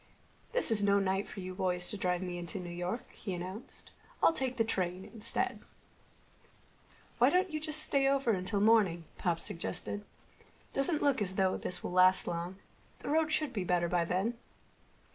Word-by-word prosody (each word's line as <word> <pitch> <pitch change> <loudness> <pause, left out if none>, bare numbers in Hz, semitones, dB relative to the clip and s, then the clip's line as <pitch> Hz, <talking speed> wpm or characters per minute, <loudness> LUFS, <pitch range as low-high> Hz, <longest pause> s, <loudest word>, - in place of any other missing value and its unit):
"This - - +3
is 215 -2 +4
no 200 0 +4
night 195 0 0
for 195 - -8
you 185 0 -6
boys 180 -1 0
to - - -2
drive 180 -2 -1
me 175 -1 -4
into 175 +3 -3
New 175 -1 -6
York," 175 +7 -4
he 190 -4 -5
announced. 185 +6 -8 0.3
"I'll - - +6
take 260 -4 -2
the 225 - +3
train 185 -4 -1
instead." 225 -1 -1 1.6
"Why - - +6
don't 365 0 +2
you 310 - -2
just 310 0 +1
stay 275 -1 +3
over 275 -3 +2
until 200 +1 0
morning?" 200 -7 +4
Pop 170 -2 0
suggested. 205 +5 -3 0.7
"Doesn't 295 +3 +2
look 280 -5 +2
as 190 -2 -2
though 190 -1 +2
this 180 - -2
will - - -4
last 185 +1 +5
long. 175 +2 -4 0.4
The - - -5
roads 315 +1 +2
should 305 -4 0
be 200 -5 -2
better 175 -1 +1
then." 180 +7 0
195 Hz, 175 wpm, -32 LUFS, 180-245 Hz, 1.6 s, I'll